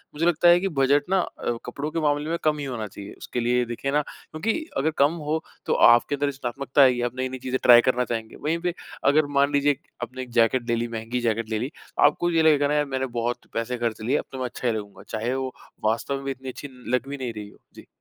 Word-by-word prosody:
मुझे 165 +3 0
लगता 175 0 +3
है 175 +1 +7
कि 195 - -1
बजट 140 +2 +4
ना 190 0 +3
अ, 120 -7 -4
कपड़ों 140 +5 -4
के 165 - -1
मामले 150 +1 +1
में 170 - 0
कम 155 -1 +2
ही 140 - -3
होना 115 -5 -4
चाहिए, 100 +1 -10
उसके 120 - -5
लिए 120 +1 +2
देखिए 120 +4 -3
ना 150 +1 +3
क्योंकि 200 - -4 0.2
अगर 155 +4 +1
कम 145 +4 +4 0.2
हो, 160 +1 0 0.2
तो - - +1 0.2
आपके 120 +4 +3
अंदर 145 +1 0
रचनात्मकता 135 +1 0
आएगी 125 -2 +5
आप - - -23
नई-नई 130 0 -3
चीज़ें 130 0 -2
ट्राई 120 -1 +9
करना 125 0 +1
चाहेंगे, 115 -1 -4
वहीं 160 +3 -1
पे 175 -1 -1 0.4
अगर 155 0 +4
मान 140 +1 +4
लीजिए 145 -1 +3 0.3
आपने 130 +2 -6
1 125 -2 -8
जैकेट 120 +1 +3
ले 115 - +3
ली, 120 +1 -1
महँगी 115 +2 -3
जैकेट 115 -1 -1
ले 110 -1 -1
ली 130 +6 -3 0.3
आपको 175 +4 +3
ये 165 -1 +3
लगेगा 145 -2 +4
ना 150 - 0
यार 150 0 +2
मैंने 130 0 0
बहुत 120 +1 -2
पैसे 115 +2 -2
खर्च 115 -2 -2
लिए 130 +7 +1
अब - - -3
तो 135 - -7
मैं 130 - -1
अच्छा 125 0 -4
ही 115 - +2
लगूँगा 100 -1 -9
चाहे 115 +4 -2
वो 130 -1 -3 0.3
वास्तव 115 +5 0
में 135 - -6
भी 135 - -1
इतनी 130 0 -7
अच्छी 140 +2 -8 0.3
लग 125 +2 -2
भी 140 - -4
नहीं 125 -4 -4
रही 105 -1 -7
हो। - - -20 0.2
जी। - - -13
130 Hz, 255 wpm, -25 LUFS, 120-145 Hz, 0.4 s, ट्राई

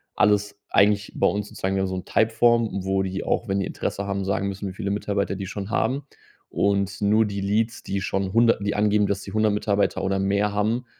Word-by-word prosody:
alles 105 -1 +2
eigentlich 105 0 +3
bei - - +3
uns 105 0 -1
sozusagen 95 +1 -2
wir 95 - +1
haben 95 - 0
so 95 - -3
'n 90 - -5
Typeform, 115 0 +2
wo 95 0 +1
die 95 0 -3
auch, 115 - -1
wenn 100 0 0
die 95 - -1
Interesse 100 0 -4
haben, 100 -1 -2
sagen 100 0 -1
müssen, 100 +1 -4
wie - - -8
viele 100 +1 -4
Mitarbeiter 100 -1 -1
die 95 0 -5
schon 100 +1 -6
haben. 125 +5 0 0.5
Und 100 0 0
nur 105 +2 +4
die 100 -1 -4
Leads, 110 +3 -1
die 100 0 -3
schon 95 0 -2
100, 115 -3 +3
die 100 - 0
angeben, 105 0 +3
dass 100 0 -1
die 95 - -9
100 110 -1 +2
Mitarbeiter 100 -2 0
oder 95 0 0
mehr 100 +2 +1
haben, 110 +4 0
100 Hz, 225 wpm, -24 LUFS, 95-105 Hz, 0.5 s, nur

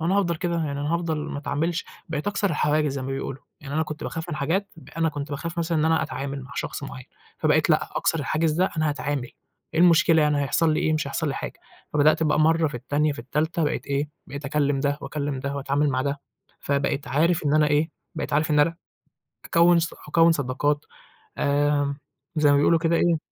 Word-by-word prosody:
أنا 180 +5 +2
هافضل 170 -4 +1
كده 175 0 -2
يعني 145 -4 -2
أنا 150 +3 0
هافضل 170 -2 -1
ما 150 -1 -4
أتعاملش، 160 +4 -1 0.2
بقيت 155 0 -3
أكسر 205 -1 0
الحواجز 150 -1 +1
زي 135 -1 -4
ما - - -5
بيقولوا، 135 0 -5 0.2
يعني 140 -2 -7
أنا 160 - +2
كُنت 150 0 -6
باخاف 165 +1 -5
من 160 - -3
حاجات، 175 +8 0 0.3
أنا 165 0 +2
كُنت 145 0 -5
باخاف 165 +4 -4
مثلًا 165 -1 0
إن 155 - +2
أنا 160 0 +3
أتعامل 140 -3 -4
مع 125 - -12
شخص - - -4
مُعين، 130 -2 -7 0.3
فبقيت - - +3
لأ - - +2
أكسر 165 - +1
الحاجز 155 +3 +1
ده 180 +4 +1
أنا 155 -1 +1
هاتعامل، 145 -3 -2 0.4
إيه 160 - +2
المشكلة 165 -2 +5
يعني 150 -1 +2
هيحصل 155 +3 +2
لي - - 0
إيه 155 - +1
مش 155 -2 0
هيحصل 155 +2 -2
لي 135 - -2
حاجة، - - -6 0.3
فبدأت 150 +2 +4
بقى 155 0 +2
مرّه 160 +1 +3
في 145 - -10
التانية 145 +5 0
في - - -10
التالتة 155 +7 -1
بقيت 150 - -2
إيه، 140 +1 -1 0.2
بقيت 140 +1 -7
أكلّم 145 -1 +1
ده 145 0 0
وأكلّم 140 -1 -3
ده 140 +1 -3
وأتعامل 140 +2 +1
مع 130 -1 0
ده، 140 +1 -2 0.4
فبقيت 140 0 -1
عارف 160 +3 +2
إن 145 0 +2
أنا 155 -1 +5
إيه، 150 +2 +2 0.2
بقيت 150 - -4
عارف 150 +2 +2
إن 150 -1 +4
أنا، 165 +3 +2 0.7
أكوّن 170 +1 +5
ص 170 0 -1
أكوّن 165 +2 +5
صداقات، 145 +1 0 0.5
آآ، 145 0 +1 0.4
زي 150 -2 +4
ما 145 - +5
بيقولوا 160 +3 +4
كده 165 0 +2
إيه 170 0 +3
150 Hz, 215 wpm, -25 LUFS, 140-165 Hz, 0.7 s, المشكلة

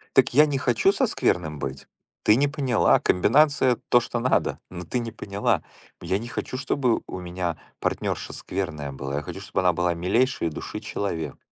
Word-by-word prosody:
Так - - +4
я 150 +2 +7
не 140 -2 -1
хочу 390 - +3
со 265 - +2
скверным 80 - 0
быть. 70 0 -5 0.4
Ты 105 - +5
не 145 +2 +3
поняла. 135 -5 +3
Комбинация 130 +6 +4
то, 120 - +6
что 120 0 -3
надо. 130 - +1
Но 90 -1 -7
ты 125 - -2
не 115 -2 -4
поняла. 100 -1 -1 0.4
Я 95 - -1
не 120 +2 -7
хочу, 130 - -4
чтобы 130 -2 +1
у 95 - -6
меня 90 -1 -3 0.2
партнёрша - - -2
скверная 75 -7 -4
была. 70 +1 -4
Я 75 - -2
хочу, - - -7
чтобы - - -2
она 90 -1 +3
была 85 +1 0
милейшей 95 - +1
души - - -6
человек. 85 -5 -4
100 Hz, 180 wpm, -25 LUFS, 85-130 Hz, 0.4 s, я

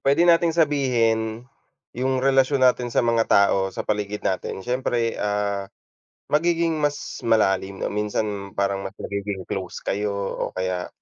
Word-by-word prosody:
pwede 140 +5 +4
nating 170 0 +5
sabihin, 120 -6 +1 0.5
yung 130 +1 -1
relasyon 135 0 +3
natin 125 -1 +3
sa 120 - +1
mga 115 -1 +2
tao 100 -1 +4
sa 95 - -6
paligid 105 0 -2
natin. 95 0 -2
Siyempre, 120 -2 0
ah, 100 -1 -1 0.6
magiging 165 0 +2
mas 145 -1 -2
malalim, 95 -4 +1
o - - -2
minsan 105 -1 -3
parang 100 0 0
mas 95 - -10
magiging 100 -2 -4
close 95 -2 -5
kayo 105 +1 -1 0.4
o - - -12
kaya 90 -1 -2
110 Hz, 140 wpm, -23 LUFS, 100-130 Hz, 0.6 s, nating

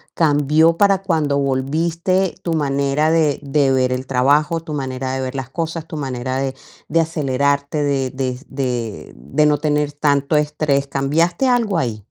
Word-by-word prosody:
¿cambió 155 +1 +3
para 195 -1 +3
cuando 155 -6 +1
volviste 165 +7 0
tu 170 - -2
manera 140 +1 +1
de 155 -3 +2
de 140 -1 +2
ver 130 -1 +2
el 130 +1 -4
trabajo, 145 +5 +2
tu 155 -2 -7
manera 130 -2 -3
de 130 - -2
ver 130 +1 -4
las 130 -2 -4
cosas, 165 0 -4
tu 160 - -7
manera 130 -2 -3
de 135 -1 -2 0.3
de 165 +2 +1
acelerarte, 140 -1 0
de 135 -2 0
de 130 -1 -3
de 125 -5 -4
de 145 - 0
no 150 -1 +3
tener 150 -1 0
tanto 145 0 +1
estrés? 150 -2 +1
¿Cambiaste 165 - +1
algo 230 -7 +2
ahí? 115 -8 -2
145 Hz, 165 wpm, -19 LUFS, 135-160 Hz, 0.3 s, cambió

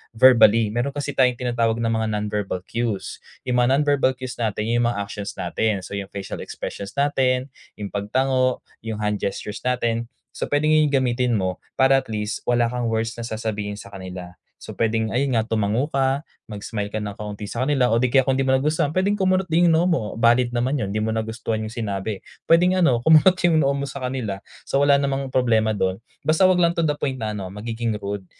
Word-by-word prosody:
verbally, 115 -3 +6
meron 120 +5 -2
kasi 145 0 -3
tayong 125 -2 +3
tinatawag 120 -2 0
ng 115 0 -1
mga 110 0 0
non-verbal 105 -3 -2
cues, 115 -2 -3 0.2
'yung 125 -1 0
mga 125 +2 +4
non-verbal 145 -3 +2
cues 125 -1 -7
natin 110 -2 -1
'yung 120 0 +2
mga 120 - -1
actions 100 0 -6
natin, 95 +2 -1
so - - -10
'yung 100 -1 -4
facial 100 -1 -6
expressions 100 0 -7
natin, 130 -2 +1 0.2
'yung 100 -2 -6
pagtango, 130 +5 0 0.2
'yung 110 -1 -5
hand 105 -1 0
gestures 100 +1 -4
natin, 120 -2 -1 0.2
so - - -4
puwedeng 150 +1 +1
'yun 155 -1 +4
'yung 140 - 0
gamitin 125 -1 +1
mo 95 -3 -1 0.2
para 135 0 +4
at 135 - -11
least 105 0 -3
wala 120 -1 +2
kang 125 -1 -2
worst 115 +1 -2
na 115 - -4
sasabihin 105 -2 -3
sa 100 -1 -11
kanila. 95 -2 -8 0.3
So - - -9
puwedeng 110 -1 0
ayun 130 -1 +1
nga 110 - +1
tumango 110 +3 0
ka, 135 0 0 0.2
mag-smile 105 0 -4
ka 105 - -4
ng 105 -1 -4
kaunti 105 0 -7
sa 115 +4 -4
kanila, 130 -3 +2
o 115 - +3
di 125 - +2
kaya 130 +1 +4
kung 135 - +2
di 135 - +1
mo 130 0 +3
nagustuhan 150 +1 0
puwedeng 185 +6 +1
kumunot 190 -2 +1
din 175 0 +3
'yung - - +4
noo 170 - +2
mo, 170 -10 +1
valid 120 +1 +4
din 120 - -4
naman 125 +3 0
'yun, 100 - -2
hindi 105 - -2
mo 110 +1 -1
nagustuhan 110 0 -3
'yung 110 - -4
sinabi. 105 -3 -4 0.2
Puwedeng 180 +2 +5
ano 165 -10 +3
kumunot 160 +4 +6
'yung 160 -2 +4
noo 140 0 +1
mo 140 - -2
sa 140 0 -7
kanila, 125 -7 -3 0.2
so 135 - +1
wala 140 0 +5
namang 140 -1 -1
problema 110 -4 +2
dun, 95 +1 -1 0.2
basta 155 +2 +2
huwag 185 - +3
lang 170 -1 +3
to 170 - -1
the 150 -2 0
point 130 -4 -3
na 105 -1 -3
ano 95 -1 -6
magiging 115 +2 -3
rude. 100 -1 -4
120 Hz, 215 wpm, -22 LUFS, 105-135 Hz, 0.3 s, verbally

